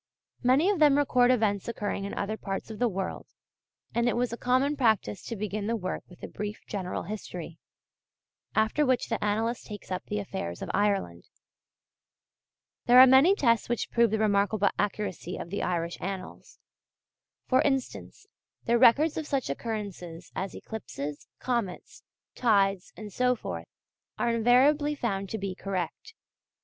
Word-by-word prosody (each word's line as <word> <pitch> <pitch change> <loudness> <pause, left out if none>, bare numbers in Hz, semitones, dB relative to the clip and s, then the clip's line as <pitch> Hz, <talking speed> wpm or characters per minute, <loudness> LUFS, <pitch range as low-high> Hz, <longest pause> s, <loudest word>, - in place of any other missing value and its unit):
Many 260 +7 +4
of 390 - -1
them 295 -2 +6
record 250 -4 +3
events 215 -6 +1
occurring 205 -3 -3
in 200 - -5
other 205 +2 -2
parts 195 0 -5
of 215 - -8
the 245 -1 +2
world; 190 -1 -4 0.7
and 235 +1 +2
it - - -1
was 245 -1 0
a - - -1
common 260 +4 +1
practice 220 - +1
to 230 - -4
begin 210 0 -3
the 230 - 0
work 185 -4 -3
with 180 - -16
a - - -4
brief 210 +1 -6
general 190 -3 -4
history, 175 -4 -7 1.0
after 220 +7 +2
which 255 -3 +1
the 225 - -2
annalist 225 +3 -1
takes 205 -3 -9
up 185 - -2
the 210 - -3
affairs 85 - -5
of - - -4
Ireland. 195 - 0 1.6
There 245 +1 +8
are 260 - +12
many 265 +9 +6
tests 230 - +2
which 240 - -2
prove 235 -1 +4
the 220 - 0
remarkable 205 -1 +2
accuracy 200 -3 -2
of 170 - -7
the 200 - -2
Irish 170 -1 -2
Annals. 190 0 -7 0.9
For 255 - +4
instance, 270 -3 -2 0.4
their 235 0 +3
records 285 +6 +5
of 315 -2 -3
such 275 -2 -1
occurrences 200 -7 -6
as 190 0 -4
eclipses, 150 -10 -7
comets, 235 -8 -3 0.3
tides, 200 -5 +2
and 210 -2 -8
so 250 +3 +2
forth, - - -6 0.5
are 235 - +1
invariably 275 +6 +4
found 195 -7 -2
to 220 - -3
be 195 -2 -3
correct. 190 - -5
215 Hz, 160 wpm, -28 LUFS, 195-250 Hz, 1.6 s, are